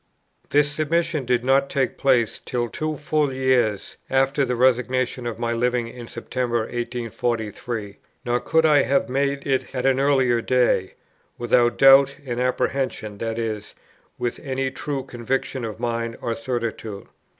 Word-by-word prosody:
This 145 0 +3
submission 155 -1 0
did 125 0 +1
not 135 +1 +3
take 135 -2 0
place 125 -5 +2
till 120 -1 -2
two 155 +3 -3
full 150 -1 0
years 130 -6 0
after 135 +1 +2
the 125 -2 0
resignation 125 0 +1
of 115 - -4
my 115 0 -1
living 120 0 0
in 120 0 -9
September 120 -2 -2
1843; 115 -2 -4 0.3
nor 120 0 +1
could 160 +5 +2
I 150 -2 +5
have 135 +1 +1
made 140 +1 -1
it 135 -1 -1
at 125 0 -2
an 135 -1 +3
earlier 130 -4 +3
day, 125 -7 +1 0.4
without 120 0 +2
doubt 135 0 +7
and 120 -2 -3
apprehension, 125 -4 -1
that 115 0 -3
is, 110 -2 -4 0.4
with 120 - -3
any 135 -1 -2
true 140 -1 -4
conviction 130 +1 -3
of 110 -1 -5
mind 115 -1 -2
or 115 - -2
certitude. 115 -3 -4
125 Hz, 150 wpm, -23 LUFS, 115-135 Hz, 0.4 s, doubt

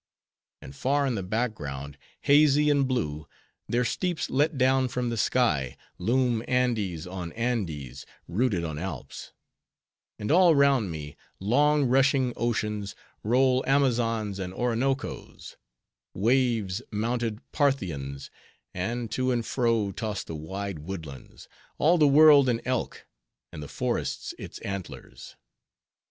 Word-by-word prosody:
And 65 - -11
far 140 - +1
in 130 - 0
the 105 - -2
background, 90 - -3 0.3
hazy 150 0 +5
and 140 -2 +2
blue, 75 - -2 0.4
their 125 +1 +1
steeps 175 - -2
let 145 +3 +1
down 130 0 +3
from 125 -1 -2
the - - -2
sky, 105 - +1 0.2
loom 120 +3 +1
Andes 110 -10 0
on 90 -2 -6
Andes, 85 - -3 0.2
rooted 100 -1 0
on 80 -2 -4
Alps; 95 +3 -7 0.9
and 105 - -3
all 175 -1 +6
round 140 -7 +3
me, 75 -3 -7 0.2
long 145 +8 +3
rushing 130 0 +3
oceans, 105 -4 -2 0.3
roll 130 +3 +3
Amazons 115 -7 +1
and 95 -1 -5
Oronocos; 125 +3 -2 0.6
waves, 115 -2 +1
mounted 115 +1 -2
Parthians; 85 - -1 0.4
and, 115 +5 -3
to 130 +2 0
and 120 -2 -1
fro, 115 -5 +1
toss 105 0 -4
the - - -8
wide 95 +3 -5
woodlands: 80 -4 -9 0.3
all 170 +3 +3
the 150 - +6
world 145 -2 +7
an 115 -2 +1
elk, 130 -1 -3 0.5
and - - -8
the 75 - -7
forests - - -3
its - - -8
antlers. 100 -2 -7
115 Hz, 125 wpm, -27 LUFS, 95-130 Hz, 0.9 s, world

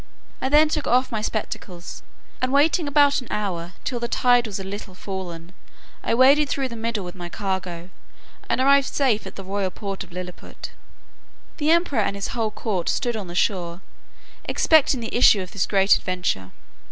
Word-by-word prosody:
I 265 - 0
then 300 +2 +6
took 300 -1 -2
off 255 +1 +2
my 220 -2 -2
spectacles, 190 -5 -5 0.4
and 255 0 0
waiting 300 +3 +3
about 285 -1 +4
an 250 - -11
hour, 180 -4 -3
till 245 -3 -2
the 235 - -2
tide 245 0 +3
was 200 -2 -5
a - - -5
little 195 -1 -7
fallen, 180 -3 -7 0.5
I - - +1
waded 275 +4 +5
through 270 -2 -1
the 235 - -7
middle 225 -3 -3
with 175 - -7
my 175 -2 -7
cargo, 185 -3 -4 0.6
and - - +1
arrived 275 +1 +4
safe 250 -7 +1
at - - -10
the 195 - -8
royal 195 0 -2
port 195 +1 -5
of - - -16
Lilliput. 180 0 -8 0.9
The 300 -1 0
emperor 335 -7 +3
and 200 -1 0
his 200 - -3
whole 225 -2 -1
court 205 -4 -2
stood 240 -4 0
on 205 -4 -5
the 175 - -8
shore, 180 -2 0 0.6
expecting 290 -5 +3
the 225 - -5
issue 220 -4 +6
of 185 - -8
this 200 - -1
great 195 -1 +4
adventure. 180 - -2
210 Hz, 185 wpm, -23 LUFS, 185-260 Hz, 0.9 s, then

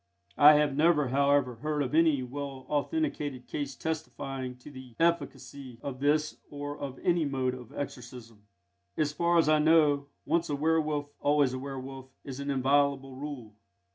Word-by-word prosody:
I 150 +1 +10
have 150 -2 +2
never, 150 -3 +3
however, 140 -2 +2
heard 150 +3 -1
of 130 - -4
any 155 -4 +4
well 135 +1 -6
authenticated 145 - -2
case 140 -2 -4
testifying 135 -5 -4
to 125 +4 -13
the 130 -3 -12
efficacy 140 -6 -1
of 135 -2 -5
this 150 +2 +1
or 145 0 -5
of 135 -2 -6
any 175 -1 +2
other 150 - 0
mode 130 -2 0
of 125 -2 -10
exorcism. 120 -5 -8 0.6
As 150 -1 0
far 170 +2 +2
as 165 - +4
I 155 0 +4
know, 150 -2 +4 0.2
once 170 +1 0
a 145 - 0
werwolf 150 -1 0
always 145 -3 +2
a 130 - -3
werwolf 135 -1 -7 0.2
is 135 -1 -7
an 140 0 -4
inviolable 135 0 +1
rule. 130 -6 -7
140 Hz, 165 wpm, -29 LUFS, 130-150 Hz, 0.6 s, I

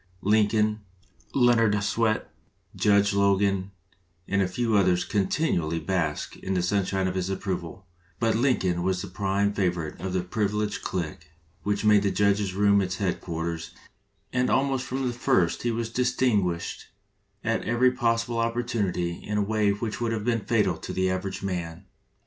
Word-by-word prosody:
Lincoln, 105 +1 +2 0.5
Leonard 115 -5 +4
Swett, 110 +1 0 0.4
Judge 100 -1 +3
Logan, 100 -1 +2 0.6
and 100 0 +1
a 95 - +2
few 115 +4 0
others 90 -3 +3
continually 95 - 0
basked 80 -5 -2
in 95 0 -3
the 90 - +1
sunshine 95 0 0
of 95 - -2
his 95 0 -2
approval; 95 -1 -4 0.3
but 115 -1 +2
Lincoln 110 -8 +1
was 95 0 0
the - - -6
prime 100 +2 0
favorite 90 -6 -2
of 95 -1 -3
the 95 - +1
privileged 105 +2 -1
clique 85 -4 -4 0.3
which 100 +4 -1
made 105 -1 +6
the 100 - +1
judge's 100 -1 +1
room 100 0 +4
its 90 -1 -2
headquarters, 85 -3 -3 0.6
and 125 0 +1
almost 135 -2 +1
from 130 +1 -2
the 125 - -1
first 95 -7 +1
he 120 - 0
was 115 0 -2
distinguished 115 -8 0 0.6
at 115 0 0
every 120 +3 +3
possible 115 -1 0
oppor 115 +1 0
tunity 90 -7 -2
in 105 - -3
a 105 - +2
way 105 0 +1
which 105 +3 -2
would 115 -1 0
have 110 -2 -3
been 115 -2 +1
fatal 100 -6 +1
to - - -7
the 95 0 +1
average 95 +1 -4
man. 90 -1 -4
100 Hz, 160 wpm, -26 LUFS, 95-115 Hz, 0.6 s, made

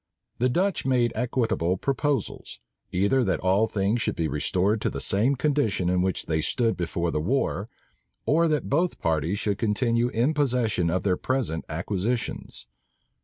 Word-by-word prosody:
The 125 +2 +3
Dutch 185 +8 0
made 125 -3 +2
equitable 110 -7 0
proposals; 140 0 -2 0.3
either 100 +8 +2
that 95 - 0
all 95 +4 +3
things 105 +3 0
should - - -1
be 80 - 0
restored 95 +9 0
to - - +1
the - - -5
same 110 +8 +2
condition 130 - +1
in 90 0 +2
which 95 -1 -1
they 80 -1 0
stood 115 +7 +1
before 85 -1 -2
the 75 - -1
war, 100 - 0 0.6
or 165 +3 +3
that 150 -2 0
both 170 +6 +1
parties 80 +3 0
should 100 0 -1
continue 115 +2 +1
in 125 +5 +1
possession 120 - +1
of 90 +2 0
their 95 -3 +1
present 130 -11 -2
acquisitions. 95 - -3
110 Hz, 160 wpm, -26 LUFS, 90-130 Hz, 0.6 s, The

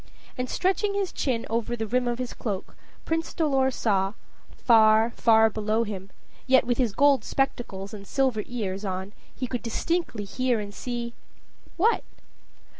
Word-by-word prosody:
And, 250 0 -3
stretching 400 +2 +1
his 395 -2 -1
chin 245 -5 -1
over 230 +1 -1
the 225 -1 -3
rim 245 +3 0
of 240 -1 -1
his 255 0 -4
cloak, 200 -5 -5 0.3
Prince 325 0 -2
Dolor 270 -5 +2
saw 200 -6 0 0.4
far, 220 -1 +4
far 225 -1 +5
below 215 +1 0
him, 195 -3 -6 0.4
yet, 260 0 +5
with 245 +1 0
his 240 -4 +2
gold 280 +1 +4
spectacles 220 -7 -2
and 200 -2 -9
silver 260 -5 +1
ears 205 -5 -3
on, 190 0 -4 0.2
he 255 - -3
could 245 -1 -3
distinctly 240 0 -1
hear 250 +3 0
and 205 -1 -6
see 240 +1 -4 0.6
what? 440 +7 +3
235 Hz, 155 wpm, -26 LUFS, 215-260 Hz, 0.6 s, far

